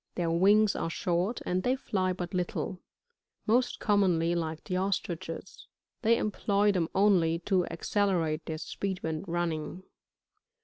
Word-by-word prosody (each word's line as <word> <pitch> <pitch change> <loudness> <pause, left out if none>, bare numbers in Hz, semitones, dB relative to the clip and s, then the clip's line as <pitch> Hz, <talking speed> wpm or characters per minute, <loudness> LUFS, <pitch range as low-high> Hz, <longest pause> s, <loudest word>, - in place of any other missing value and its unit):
Their 170 -2 0
whigs 200 +5 +4
are - - -2
short, 180 +5 -1
and 180 +1 0
they 250 +6 +1
fly 190 -7 -1
but 180 -1 -5
little; 180 +1 -2 0.7
most 245 +3 +2
commonly 180 -6 +2
like 160 -2 -3
the 185 - -3
Ostriches* 185 -2 -3 0.3
they 230 0 +4
employ 205 -1 +1
them 175 -4 0
only 185 -5 +4
to 185 -3 +2
accelerate 170 -3 0
their 160 - -3
speed 185 +4 -4
when 160 +1 -2
running. 170 0 -2
180 Hz, 135 wpm, -29 LUFS, 165-200 Hz, 0.7 s, whigs